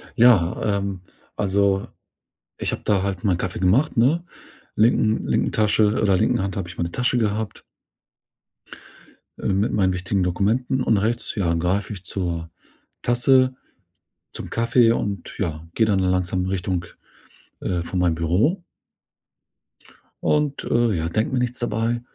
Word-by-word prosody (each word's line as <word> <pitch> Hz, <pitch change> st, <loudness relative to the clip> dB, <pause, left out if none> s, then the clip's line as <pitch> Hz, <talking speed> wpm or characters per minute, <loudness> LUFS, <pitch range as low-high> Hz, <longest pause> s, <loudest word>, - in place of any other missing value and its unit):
Ja, 115 Hz, -8 st, +5 dB, 0.2 s
ähm, 100 Hz, -2 st, -4 dB, 0.3 s
also, 100 Hz, -1 st, +1 dB, 0.7 s
ich -, -, -2 dB
habe -, -, -4 dB
da 100 Hz, -2 st, +2 dB
halt 95 Hz, -3 st, -3 dB
meinen 95 Hz, -4 st, +2 dB
Kaffee 90 Hz, -, -4 dB
gemacht, 110 Hz, +13 st, +2 dB
ne? 145 Hz, +9 st, +3 dB, 0.5 s
Linken 110 Hz, 0 st, +2 dB
linken -, -, +1 dB
Tasche 105 Hz, 0 st, +2 dB
oder 100 Hz, -3 st, +3 dB
linken 115 Hz, 0 st, +1 dB
Hand 95 Hz, -1 st, -3 dB
habe 90 Hz, -3 st, -4 dB
ich 85 Hz, -, -11 dB
meine 85 Hz, 0 st, -2 dB
Tasche 125 Hz, 0 st, 0 dB
gehabt. 110 Hz, -1 st, -2 dB, 1.8 s
Äh, -, -, -3 dB
mit 100 Hz, +3 st, +1 dB
meinen 95 Hz, -3 st, +2 dB
wichtigen 90 Hz, +1 st, -1 dB
Dokumenten. 110 Hz, +8 st, 0 dB
Und 110 Hz, -, +2 dB
rechts, 115 Hz, +4 st, -1 dB
ja, 90 Hz, -6 st, 0 dB
greife 90 Hz, +5 st, -1 dB
ich 95 Hz, -, -9 dB
zur 85 Hz, -3 st, -3 dB, 0.5 s
Tasse 130 Hz, +1 st, +3 dB, 0.8 s
zum -, -, -7 dB
Kaffee 115 Hz, 0 st, +3 dB
und 100 Hz, -5 st, -3 dB
ja, 80 Hz, -4 st, -3 dB
gehe 110 Hz, -, +3 dB
dann 100 Hz, -3 st, +2 dB
langsam 90 Hz, 0 st, 0 dB
Richtung, 90 Hz, -2 st, -2 dB, 0.8 s
äh, 90 Hz, -2 st, -1 dB
von 90 Hz, +1 st, -3 dB
meinem 85 Hz, -3 st, +2 dB
Büro. 100 Hz, -, +1 dB, 1.6 s
Und, 150 Hz, -2 st, +1 dB
äh, 120 Hz, -2 st, +2 dB
ja, 80 Hz, +1 st, -2 dB
denke 110 Hz, +8 st, -1 dB
mir 125 Hz, -, +1 dB
nichts 125 Hz, 0 st, -2 dB
dabei. 120 Hz, 0 st, -1 dB
100 Hz, 145 wpm, -22 LUFS, 90-115 Hz, 1.8 s, Ja